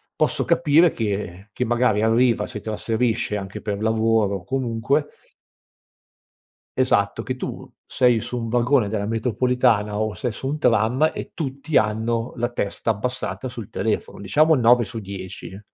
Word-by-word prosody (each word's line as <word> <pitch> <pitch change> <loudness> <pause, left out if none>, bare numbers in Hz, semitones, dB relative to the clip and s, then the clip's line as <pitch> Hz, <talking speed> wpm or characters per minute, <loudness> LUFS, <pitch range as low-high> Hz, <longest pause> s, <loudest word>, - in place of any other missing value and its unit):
posso - - 0
capire 165 +1 +4
che 100 -3 -4
che 125 - -1
magari 120 -3 +2
arriva, 115 +1 +2
si 105 - -7
trasferisce 110 0 -1
anche 95 -1 -7
per 105 -1 -3
lavoro, 110 -3 +1
comunque 130 +4 -1 1.7
Esatto, 105 -4 +1
che 130 - -2
tu - - -6 0.2
sei 125 -3 +2
su 125 - -4
un 115 -1 -4
vagone 120 -1 +2
della 100 -1 -2
metropolitana 115 -2 +1
o 110 -1 -1
sei 125 -3 -3
su 120 +5 -6
un 150 +3 -2
tram 120 +6 +3
e - - -7
tutti 140 0 -3
hanno 115 +2 +1
la 120 0 0
testa 115 0 -2
abbassata 125 +4 -3
sul 115 -5 -8
telefono. - - -2
Diciamo 155 +12 +3
9 120 -2 +4
su 110 +3 -6
10. 95 0 -8
115 Hz, 145 wpm, -22 LUFS, 105-125 Hz, 1.7 s, capire